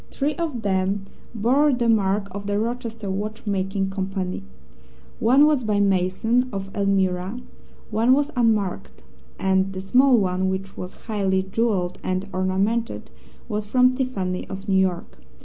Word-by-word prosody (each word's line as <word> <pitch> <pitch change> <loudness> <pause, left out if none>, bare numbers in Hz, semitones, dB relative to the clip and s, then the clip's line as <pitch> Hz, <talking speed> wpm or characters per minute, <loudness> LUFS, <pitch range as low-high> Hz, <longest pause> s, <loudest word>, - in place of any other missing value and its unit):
Three 290 +2 -1
of 310 -9 -3
them 195 0 0 0.3
bore 265 +7 +3
the 245 -2 0
mark 200 -2 +2
of 200 +1 -6
the 205 0 0
Rochester 230 -1 -3
Watchmaking 195 -1 -2
Company; 190 -1 -3 0.8
one 260 +6 +5
was 300 -4 +2
by 210 -2 +1
Mason, 200 +6 +2
of 195 0 -6
Elmira; 195 +1 0 0.5
one 230 +4 +4
was 290 +2 +1
unmarked; 200 - 0 0.3
and 190 0 +1
the 190 - -5
small 250 +7 +4
one, 190 -2 +1
which 190 +1 -4
was 180 0 -7
highly 195 -4 0
jewelled 190 -3 -1
and 185 +1 -2
ornamented, 195 +5 -1 0.4
was 210 -2 -3
from 250 +4 +4
Tiffany, 205 -9 -2
of 195 +1 -7
New 190 -1 +3
York. 175 - -2
200 Hz, 140 wpm, -23 LUFS, 190-230 Hz, 0.8 s, one